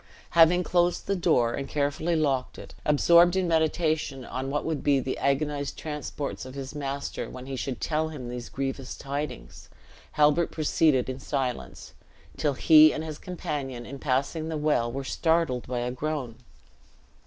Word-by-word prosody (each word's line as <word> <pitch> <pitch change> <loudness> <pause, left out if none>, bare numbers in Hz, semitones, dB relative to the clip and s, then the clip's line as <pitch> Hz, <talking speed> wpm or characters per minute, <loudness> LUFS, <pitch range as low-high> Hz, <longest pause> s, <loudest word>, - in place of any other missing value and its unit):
Having 170 +1 +5
closed 175 0 +1
the 200 - 0
door, 155 -10 +2
and 135 - -4
carefully 150 +4 0
locked 140 -5 0
it, - - -11
absorbed 170 +4 +5
in 190 -1 +1
meditation 160 -4 0
on 130 +2 -4
what 145 +1 -2
would 160 -3 -2
be 140 -2 +3
the 130 0 -2
agonized 145 +1 -1
transports 150 -2 -5
of 130 +1 -9
his 135 0 -6
master, 140 -1 -4
when 125 0 -9
he 135 0 -5
should 130 -1 -4
tell 160 0 -1
him 140 -6 -7
these 120 -1 -6
grievous 135 -1 -4
tidings, 140 - -6 0.4
Halbert 150 +3 +3
proceeded 155 -3 +2
in 130 0 -4
silence, 130 - -4 0.4
till 145 -2 0
he 155 +2 +7
and 155 - -4
his 155 -2 -6
companion 140 -9 -5
in 135 +2 -8
passing 140 +4 -1
the 160 - -2
well 150 -6 +1
were 135 +2 -4
startled 160 -3 0
by 125 -1 -2
a 120 +1 -2
groan. 130 -3 -4
145 Hz, 165 wpm, -27 LUFS, 130-160 Hz, 0.4 s, he